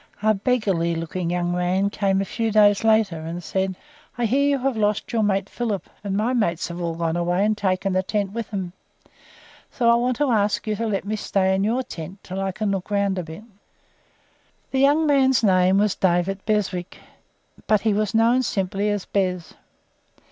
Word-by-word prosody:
A 215 0 +4
beggarly 195 -6 0
looking 165 +1 -3
young 175 0 -1
man 180 +3 0
came 195 -2 +1
a - - -2
few 225 +2 -2
days 205 0 +4
later, 220 -6 +3
and 165 +2 -6
said: 190 +2 -2 0.4
"I 240 - 0
hear 275 +5 +2
you 280 - +2
have 265 -1 -1
lost 210 +2 -1
your 225 - +2
mate 195 -2 +1
Philip, 220 -5 -3 0.2
and 200 -1 -2
my 225 +4 0
mates 180 -10 0
have 170 +1 -6
all 170 -1 -2
gone 165 0 -1
away 175 +3 +1
and 215 0 +1
taken 190 -1 -1
the 185 - +2
tent 200 +1 -2
with 230 0 -5
them; 190 -4 -4 1.0
so 235 -2 +2
I - - +6
want 240 +1 +1
to 290 -2 +1
ask 210 -2 +1
you 215 -1 -1
to 225 +2 -2
let 200 -3 -2
me 215 +2 -2
stay 190 -2 0
in 190 +1 +1
your 235 +5 0
tent 180 -5 -8
until 190 +1 -5
I 195 0 -1
can 210 +1 -2
look 195 -1 -3
round 200 -2 0
a - - -3
bit." 160 +5 -10 1.3
This 265 - +1
young 290 +3 +4
man's 265 -4 +3
name 185 -1 +4
was 205 -1 +2
David 190 +1 0
Beswick, 190 -4 -1 0.7
but 215 -2 +3
he 220 -2 +1
was 215 +1 -1
known 230 +3 +4
simply 200 -2 -1
as 205 -2 -2
"Bez." 180 -4 -2
200 Hz, 200 wpm, -23 LUFS, 185-220 Hz, 1.3 s, I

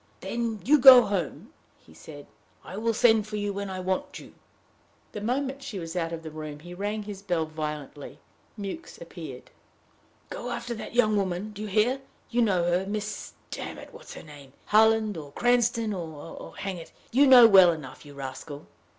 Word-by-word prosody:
"Then 230 -3 -3
you 295 +4 +5
go 255 -1 +10
home," 195 -7 -4 0.2
he 80 - -20
said. 145 - -12 0.4
"I - - -8
will 225 +3 0
send 220 -2 +4
for 215 - -6
you 205 -1 -2
when 200 0 -4
I 185 -1 -5
want 185 0 -3
you." - - -13 0.8
The 210 - -7
moment 265 +4 -2
she 270 -7 -7
was 165 -2 -6
out 165 -2 -2
of 165 -1 -6
the 160 - -7
room, 155 -1 -7
he 175 +2 -10
rang 205 +3 -3
his 200 -2 -8
bell 175 -5 -1
violently. 150 -2 -6 0.4
Mewks 205 - -7
appeared. - - -10 0.8
"Go 245 - -5
after 240 0 -4
that 225 +1 -8
young 215 -3 +3
woman 195 +1 -2
do 205 0 -9
you 215 - -4
hear? 225 +7 +1 0.3
You 240 0 +2
know 190 -6 +2
her 175 +2 0
Miss 210 +1 -5 0.2
damn - - -6
it, - - -12
what's - - -11
her - - -10
name? 145 -4 -14
Harland 220 -2 +3
or 145 -3 -9
Cranston, 235 -1 +1
or 165 -4 -6 0.2
oh, - - -11
hang 195 -2 -4
it! 165 - -11 0.2
you 275 +4 +5
know 250 -3 +9
well 190 -4 +7
enough, 155 -5 -8
you 145 -1 -13
rascal!" 140 +2 -8
200 Hz, 190 wpm, -27 LUFS, 165-225 Hz, 0.8 s, go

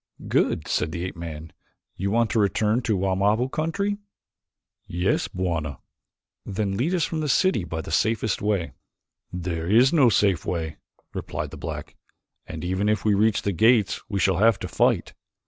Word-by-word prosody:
"Good," - - +1
said 80 - 0
the 85 +1 -3
ape 95 - -6
man. 80 -2 -7 0.4
"You 100 +2 -2
want 115 +2 +2
to 115 - +2
return 105 +3 +2
to 115 -2 0
the - - +1
Wamabo 100 +6 +1
country?" 200 +6 -1 0.9
"Yes, 90 +3 0
Bwana." 85 -5 -3 0.7
"Then 100 0 -2
lead 155 - 0
us 170 - +1
from 160 - -3
the 150 -1 -1
city 185 - +3
by 80 -1 -4
the - - -8
safest 110 -2 +1
way." 100 -7 0 0.6
"There 85 -2 -3
is 120 - +5
no 140 -7 +6
safe 95 -4 +2
way," 80 -3 -3 0.4
replied - - -4
the - - -8
black, - - -6 0.5
"and 80 0 -7
even 95 +3 0
if 105 0 0
we 105 - +4
reach 105 +2 +2
the 100 - 0
gates 110 +3 +3
we 100 -2 -1
shall 95 -1 +2
have 110 0 +4
to - - -3
fight. - - +1
100 Hz, 175 wpm, -24 LUFS, 90-115 Hz, 0.9 s, no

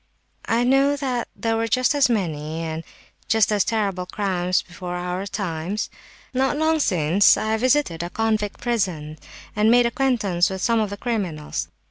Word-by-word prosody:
"I 230 +2 +2
know 270 +3 +3
that 255 -4 -2
there 225 -1 -1
were 225 0 0
just 255 +4 +2
as 285 -3 +3
many, 160 -7 -2
and 160 0 -4 0.4
just 220 0 +3
as 205 -2 +3
terrible, 195 -5 -1
crimes 185 -2 0
before 180 0 -7
our 180 +2 -3
times. 190 0 -3 0.4
Not 265 +2 +1
long 315 +1 +2
since 180 - +4
I 220 0 0
visited 255 - +1
a 175 - -4
convict 215 0 -1
prison 180 -11 -2 0.4
and 210 +1 +3
made 245 +1 +5
acquaintance 235 -8 +1
with 190 0 -5
some 230 -1 +3
of 215 -2 0
the 205 - -6
criminals. 190 -11 -3
210 Hz, 160 wpm, -23 LUFS, 180-240 Hz, 0.4 s, made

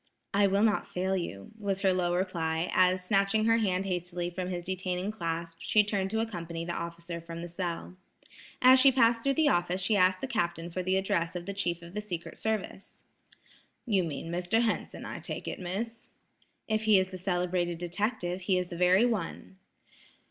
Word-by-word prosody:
"I 200 0 +4
will 200 +2 +2
not 220 -2 +2
fail 190 +1 -1
you," 100 - -5
was 195 -2 -1
her 190 -2 +4
low 175 -1 +1
reply, 170 -2 -1
as 185 0 +3
snatching 200 +2 +2
her 225 0 +4
hand 190 -3 0
hastily 175 -1 -3
from 180 +1 -4
his 175 -1 -4
detaining 185 +1 -2
clasp, 165 -4 -4
she 210 +4 +4
turned 200 -2 -1
to 220 +2 0
accompany 170 -6 -4
the 175 - -3
officer 170 0 -5
from 170 0 -7
the - - -5
cell. 175 0 -4 0.7
As 260 +1 +8
she 270 +1 +8
passed 235 -2 +4
through 275 +2 +1
the 315 -2 +4
office 175 -3 +1
she 200 +3 +2
asked 185 -1 +4
the - - -1
captain 175 -8 -2
for 185 - -2
the 185 +1 +1
address 170 -3 0
of 175 -1 -4
the 200 - -4
chief 175 -4 -2
of 170 +1 -11
the 210 - -3
secret 180 -5 -6
service. 215 -3 -4 0.8
"You 200 -6 +2
mean 165 +1 -5
Mr. 180 +7 +1
Henson, 225 - -2
I - - -6
take - - -6
it, - - -4
Miss?" 205 +6 -5 0.6
"If 220 0 0
he 215 -2 +6
is 190 0 +1
the 185 - -7
celebrated 175 -1 0
detective, 180 +1 -2
he 185 0 +1
is 180 -1 -2
the 175 - -6
very 180 +5 +5
one." 195 -4 -3
185 Hz, 195 wpm, -29 LUFS, 175-205 Hz, 0.8 s, As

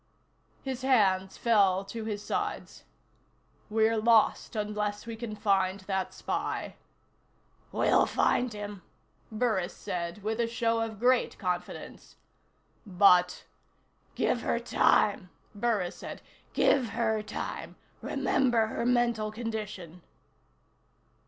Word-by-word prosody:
His 260 -2 -4
hands 195 -8 +2
fell 195 -4 +3
to 220 +2 -6
his 210 -2 -4
sides. - - -4 0.8
"We're 220 +1 +2
lost, 225 +1 +3
unless 210 0 -2
we 230 -1 -6
can 225 -1 -6
find 195 -2 +1
that 190 -1 -2
spy." - - -3 1.0
"We'll - - +3
find 245 -1 +1
him," 205 -2 -7 0.5
Burris 215 -5 -1
said 180 0 -4
with 220 +2 -2
a 235 - +2
show 230 0 0
of 220 -2 -4
great 250 +1 +2
confidence. 180 -2 -5 0.7
"But 180 -2 +4 0.3
" - - -39
"Give - - +1
her - - 0
time," 195 -3 +2 0.2
Burris 205 -4 -1
said. - - -8 0.3
"Give 255 -5 +3
her 220 -2 0
time. 215 +1 -6 0.3
Remember 240 -4 +1
her 230 +2 -2
mental 235 -3 +1
condition." 210 -6 -6
215 Hz, 110 wpm, -29 LUFS, 195-230 Hz, 1.0 s, But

